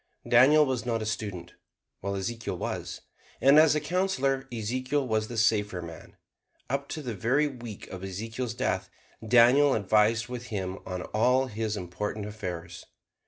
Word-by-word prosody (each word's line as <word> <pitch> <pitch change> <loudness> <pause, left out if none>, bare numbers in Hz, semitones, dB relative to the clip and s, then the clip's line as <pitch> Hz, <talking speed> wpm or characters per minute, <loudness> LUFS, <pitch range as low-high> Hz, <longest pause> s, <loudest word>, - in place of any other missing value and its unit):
Daniel 150 +4 +6
was 130 -4 -2
not 115 -2 -1
a - - -4
student, 100 -5 -4 0.5
while 100 +1 -3
Ezekiel 115 +4 -4
was; - - -5 0.4
and 140 +3 +7
as 155 -1 +5
a - - +2
counselor 145 -6 0
Ezekiel 130 +5 -1
was 110 -1 0
the 120 - -6
safer 105 -4 +2
man. 85 -1 -10 0.5
Up 140 +1 -1
to 155 - -5
the 120 -3 -4
very 125 +9 +1
week 120 -6 -8
of 95 0 -8
Ezekiel's 115 +5 -4
death - - -1 0.3
Daniel 125 +5 +5
advised 110 +2 +2
with 125 0 -6
him 95 -4 -4
on 90 -1 -4
all 125 +5 +2
his 110 -3 -3
important 100 +4 -4
affairs. 90 -5 -6
115 Hz, 155 wpm, -28 LUFS, 105-130 Hz, 0.5 s, and